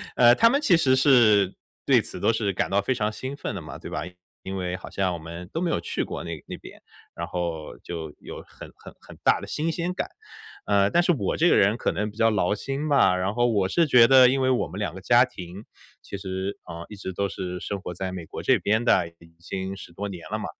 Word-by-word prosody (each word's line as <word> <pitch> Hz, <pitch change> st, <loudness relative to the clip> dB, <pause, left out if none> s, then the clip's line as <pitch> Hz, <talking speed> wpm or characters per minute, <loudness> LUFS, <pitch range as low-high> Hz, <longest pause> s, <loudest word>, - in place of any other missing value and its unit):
呃， 120 Hz, 0 st, +6 dB
他 230 Hz, -, +5 dB
们 280 Hz, -, +2 dB
其 195 Hz, -12 st, +4 dB
实 130 Hz, -5 st, +3 dB
是 115 Hz, -8 st, +5 dB, 0.3 s
对 -, -, +5 dB
此 -, -, -9 dB
都 -, -, +3 dB
是 105 Hz, -3 st, 0 dB
感 -, -, -1 dB
到 100 Hz, +1 st, +2 dB
非 130 Hz, -, 0 dB
常 105 Hz, -3 st, -1 dB
兴 130 Hz, +5 st, -6 dB
奋 140 Hz, -, -5 dB
的 95 Hz, -, -5 dB
嘛， 75 Hz, -, -9 dB
对 -, -, -9 dB
吧， -, -, -3 dB, 0.4 s
因 95 Hz, 0 st, -5 dB
为 90 Hz, -1 st, -3 dB
好 -, -, -9 dB
像 95 Hz, -2 st, -1 dB
我 85 Hz, -, -5 dB
们 85 Hz, +2 st, -9 dB
都 165 Hz, -, -2 dB
没 175 Hz, -, 0 dB
有 -, -, 0 dB
去 85 Hz, -, -3 dB
过 -, -, -6 dB
那 85 Hz, -, -6 dB, 0.2 s
那 -, -, -6 dB
边， -, -, -14 dB, 0.3 s
然 85 Hz, -, -4 dB
后 85 Hz, -3 st, -4 dB
就 80 Hz, -3 st, -7 dB
有 -, -, -9 dB
很 -, -, -12 dB
很 -, -, -13 dB
很 -, -, -14 dB
大 -, -, +4 dB
的 -, -, -9 dB
新 160 Hz, +2 st, -2 dB
鲜 175 Hz, +2 st, -3 dB
感。 -, -, -4 dB, 0.6 s
嗯， 100 Hz, 0 st, +3 dB
但 175 Hz, -, +5 dB
是 175 Hz, -, +3 dB
我 145 Hz, -, -1 dB
这 170 Hz, +2 st, +4 dB
个 -, -, +5 dB
人 100 Hz, +4 st, +3 dB
可 -, -, 0 dB
能 105 Hz, +1 st, -2 dB
比 105 Hz, -, -20 dB
较 115 Hz, -1 st, +4 dB
劳 100 Hz, -3 st, +1 dB
心 135 Hz, +7 st, -4 dB
吧， 140 Hz, -10 st, +4 dB
然 95 Hz, +2 st, -1 dB
后 120 Hz, +1 st, +2 dB
我 100 Hz, -5 st, +1 dB
是 170 Hz, -, +3 dB
觉 125 Hz, -4 st, +7 dB
得 130 Hz, -1 st, +8 dB
因 135 Hz, +1 st, +1 dB
为 130 Hz, -, +2 dB
我 130 Hz, -, +1 dB
们 95 Hz, -, -9 dB
两 100 Hz, -6 st, -2 dB
个 95 Hz, -, -8 dB
家 120 Hz, +4 st, +5 dB
庭 95 Hz, -5 st, -10 dB, 0.4 s
其 100 Hz, -, -7 dB
实， 95 Hz, 0 st, -4 dB
嗯， 85 Hz, 0 st, -7 dB
一 105 Hz, -, -9 dB
直 95 Hz, -2 st, -6 dB
都 100 Hz, +2 st, -1 dB
是 90 Hz, -2 st, -5 dB
生 100 Hz, -, -4 dB
活 90 Hz, -2 st, -6 dB
在 95 Hz, +2 st, -4 dB
美 90 Hz, -3 st, -7 dB
国 -, -, -8 dB
这 -, -, +3 dB
边 110 Hz, +3 st, +1 dB
的， 95 Hz, -7 st, +3 dB
已 85 Hz, 0 st, -18 dB
经 95 Hz, +2 st, -5 dB
10 85 Hz, -, -11 dB
多 100 Hz, +4 st, -4 dB
年 90 Hz, -3 st, -8 dB
了 -, -, -2 dB
嘛。 -, -, -5 dB
100 Hz, 275 characters per minute, -25 LUFS, 90-125 Hz, 0.6 s, 得